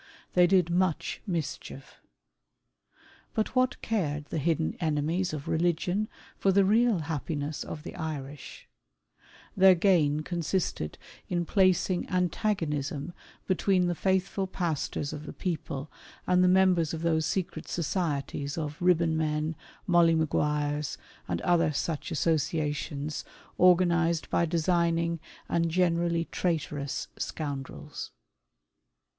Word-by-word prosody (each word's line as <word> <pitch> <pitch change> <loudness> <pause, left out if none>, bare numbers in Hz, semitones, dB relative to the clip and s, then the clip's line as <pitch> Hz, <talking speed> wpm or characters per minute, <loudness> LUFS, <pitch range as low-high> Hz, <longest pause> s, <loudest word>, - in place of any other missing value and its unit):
They 180 -1 +6
did 180 -2 +3
much 180 -2 0
mischief. 160 -5 -5 1.3
But 220 +4 -1
what 255 0 +2
cared 150 -10 -1
the 155 - -3
hidden 160 +1 0
enemies 160 +3 0
of 155 0 -6
religion 175 +5 0 0.3
for 195 - +3
the 195 0 +4
real 220 -2 +3
happiness 150 -1 -3
of 150 - -7
the - - -8
Irish? 150 -4 -6 0.9
Their 190 -1 +7
gain 165 -5 +3
con 175 +2 -4
sisted 160 - -1 0.3
in 175 -1 0
placing 185 -1 +2
antagonism 170 -5 -1 0.3
between 185 -1 +2
the 175 - +1
faithful 190 +2 0
pastors 160 -5 -2
of 150 +1 -7
the - - -6
people 155 -5 -4 0.3
and 180 0 +4
the - - +5
members 180 -4 +4
of 160 - -6
those 160 -1 +2
secret 185 -3 -3
societies 145 -4 -2
of 150 -2 -4
Eibbonmen, 160 -3 +2 0.3
Molly 170 -3 +5
Maguires, 150 -2 0 0.3
and 85 -2 -2
other 170 -3 +3
such 150 +1 -2
associations, 150 -1 -1 0.4
organized 170 -2 +4
by 170 - +2
designing 170 0 +1 0.3
and, 170 0 +1
generally, 170 -1 +1
traitorous 145 -5 -2
scoundrels. 140 -4 -5
165 Hz, 115 wpm, -28 LUFS, 150-180 Hz, 1.3 s, Their